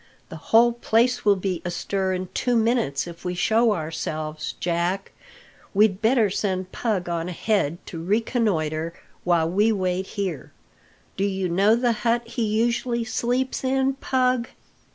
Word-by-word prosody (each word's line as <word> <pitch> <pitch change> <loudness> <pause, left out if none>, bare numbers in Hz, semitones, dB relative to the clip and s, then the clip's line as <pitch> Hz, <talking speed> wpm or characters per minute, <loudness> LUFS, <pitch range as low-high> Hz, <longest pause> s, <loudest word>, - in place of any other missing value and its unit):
"The - - -8
whole 235 +2 +6
place 240 +1 +1
will 205 -1 +5
be 185 -2 -3
astir 190 +2 -2
in 185 0 -4
two 245 -1 0
minutes 225 - +1
if 170 -1 -10
we 180 -1 -3
show 225 +5 +3
ourselves, 155 -2 -4
Jack. 175 +3 -1 0.6
We'd 205 -1 +3
better 225 -1 +4
send 185 -2 -2
Pug 205 -7 -1
on 170 0 -2
ahead 180 -3 0
to 165 -1 -7
reconnoitre 170 -7 0 0.3
while 170 -2 +2
we 205 +6 +2
wait 185 -2 -1
here. 180 -10 -3 0.6
Do 195 - 0
you 190 -2 -1
know 200 +6 +4
the 240 0 +2
hut 235 0 +1
he 235 0 -2
usually 235 +2 0
sleeps 245 +4 -1
in, 265 +1 +1
Pug?" 255 -2 0
200 Hz, 145 wpm, -24 LUFS, 175-235 Hz, 0.6 s, whole